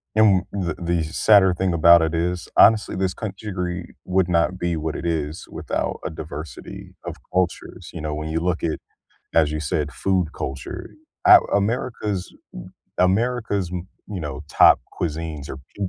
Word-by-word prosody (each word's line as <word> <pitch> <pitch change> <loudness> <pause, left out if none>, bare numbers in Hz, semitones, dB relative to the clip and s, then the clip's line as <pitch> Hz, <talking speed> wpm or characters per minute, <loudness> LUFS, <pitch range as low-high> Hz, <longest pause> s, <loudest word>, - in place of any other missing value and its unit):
And 105 -4 +5
the 90 -5 -2
the 85 -1 0
sadder 95 +4 +4
thing 90 +1 0
about 85 +1 +7
it 80 0 0
is, 85 +1 -1
honestly, 110 -1 +5
this 95 -1 0
country 105 +1 -6
gri 90 -1 -4
would 90 -1 +1
not 85 +1 +2
be 85 -1 -1
what 80 0 -3
it - - -5
is 80 -2 -2
without - - -3
a - - -1
diversity 80 0 -8
of - - -5 0.2
cultures, 90 -2 -2
you - - -6
know, 75 0 -3
when 75 +1 -4
you 80 +1 0
look 90 +1 -1
it, 80 -2 -2 0.5
as 80 -2 +3
you 75 - -2
said, 75 0 -2
food 95 +2 0
culture, 65 0 -6 0.3
A 360 -1 +10 0.2
America's 105 -2 -2 0.7
m - - +5
America's 110 -4 -1
m 90 0 -5 0.2
you 100 -3 -5
know, 75 -2 -5
top - - +6 0.2
cuisines 80 -3 -3
are, - - -6 0.2
p 100 - -1
85 Hz, 170 wpm, -22 LUFS, 80-95 Hz, 0.7 s, A